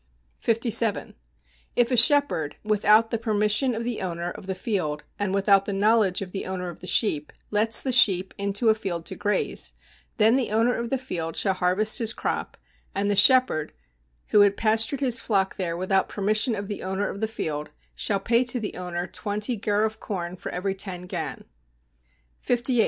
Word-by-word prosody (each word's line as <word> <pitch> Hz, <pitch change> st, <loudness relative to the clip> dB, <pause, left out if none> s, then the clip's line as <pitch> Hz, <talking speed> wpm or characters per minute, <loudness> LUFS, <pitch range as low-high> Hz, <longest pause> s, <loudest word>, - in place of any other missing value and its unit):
57. 230 Hz, -1 st, +1 dB, 0.6 s
If 245 Hz, +1 st, +2 dB
a -, -, +3 dB
shepherd, 280 Hz, -, +4 dB
without 215 Hz, +1 st, +3 dB
the 230 Hz, -, -1 dB
permission 215 Hz, +3 st, +1 dB
of 225 Hz, -, -4 dB
the 240 Hz, -1 st, -3 dB
owner 175 Hz, -1 st, -4 dB
of 190 Hz, -, -11 dB
the 190 Hz, -, -3 dB
field, 180 Hz, -8 st, -3 dB, 0.2 s
and 205 Hz, -2 st, -1 dB
without 195 Hz, 0 st, +3 dB
the 200 Hz, -, -3 dB
knowledge 200 Hz, -1 st, +2 dB
of 180 Hz, -, -10 dB
the 195 Hz, -, -5 dB
owner 180 Hz, -1 st, -4 dB
of 170 Hz, -, -14 dB
the 180 Hz, -, -10 dB
sheep, 155 Hz, -11 st, +1 dB, 0.2 s
lets 215 Hz, +2 st, +4 dB
the 265 Hz, -, -1 dB
sheep 190 Hz, -6 st, +4 dB
into 200 Hz, +3 st, +1 dB
a -, -, +6 dB
field 180 Hz, -6 st, -5 dB
to -, -, -5 dB
graze, 205 Hz, 0 st, -1 dB, 0.4 s
then 225 Hz, +2 st, +4 dB
the 255 Hz, -, -1 dB
owner 225 Hz, +3 st, +2 dB
of 235 Hz, 0 st, -4 dB
the 270 Hz, -, 0 dB
field 170 Hz, -11 st, -5 dB
shall 195 Hz, -, +2 dB
harvest 190 Hz, +6 st, +1 dB
his 230 Hz, -1 st, 0 dB
crop, -, -, -4 dB, 0.4 s
and 200 Hz, +1 st, 0 dB
the -, -, +1 dB
shepherd, 230 Hz, -, +4 dB, 0.6 s
who 210 Hz, -, +4 dB
had 200 Hz, -1 st, +4 dB
pastured 225 Hz, +5 st, +1 dB
his 255 Hz, -3 st, +2 dB
flock 195 Hz, -4 st, -1 dB
there 170 Hz, -3 st, -3 dB
without 190 Hz, +1 st, 0 dB
permission 215 Hz, +4 st, 0 dB
of 200 Hz, 0 st, -5 dB
the 205 Hz, -1 st, -6 dB
owner 190 Hz, +2 st, -2 dB
of 200 Hz, -, -7 dB
the 220 Hz, -, 0 dB
field, 150 Hz, -8 st, -4 dB, 0.2 s
shall 200 Hz, -2 st, -1 dB
pay 235 Hz, +5 st, +2 dB
to 245 Hz, 0 st, 0 dB
the 215 Hz, -, -5 dB
owner 180 Hz, -1 st, -4 dB
twenty 210 Hz, +5 st, -2 dB
gur 210 Hz, -1 st, 0 dB
of 220 Hz, 0 st, -2 dB
corn 180 Hz, -3 st, -5 dB
for -, -, -7 dB
every 190 Hz, +2 st, -2 dB
ten 190 Hz, -2 st, -4 dB
gan. 180 Hz, -, -5 dB, 1.0 s
58. 245 Hz, 0 st, 0 dB
205 Hz, 190 wpm, -25 LUFS, 190-230 Hz, 1.0 s, a